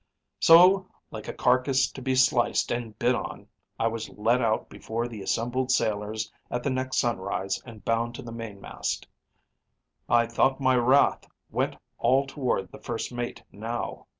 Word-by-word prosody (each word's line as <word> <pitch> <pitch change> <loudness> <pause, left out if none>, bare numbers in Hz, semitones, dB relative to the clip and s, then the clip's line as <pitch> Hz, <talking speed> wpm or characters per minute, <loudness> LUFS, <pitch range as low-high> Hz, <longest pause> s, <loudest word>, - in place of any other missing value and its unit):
"So, 185 +3 +7 0.2
like 110 -1 -7
a - - -4
carcass 130 +1 +2
to 135 - -9
be 130 0 0
sliced 130 -2 +3
and 120 -3 -3
bid - - +2
on, - - -5 0.3
I 115 - 0
was 115 -1 -2
lead 115 +4 +1
out 110 -2 +1
before 115 +2 -4
the 110 -4 -8
assembled 120 +6 -1
sailors 110 -2 0 0.2
at 120 0 -3
the 140 - 0
next 130 0 -2
sunrise 95 -3 -1
and 110 -3 -12
bound 115 +1 0
to - - -8
the 115 - -8
main 115 -3 -7
mast. - - -4 1.0
I 120 0 +5
thought 130 +4 +1
my 130 -1 +3
wrath 130 +3 +3 0.2
went - - 0 0.2
all 130 +4 +3
toward 130 - -2
the - - -11
first 115 +1 -4
mate 120 0 -4
now. 115 +3 -5
120 Hz, 165 wpm, -27 LUFS, 110-130 Hz, 1.0 s, So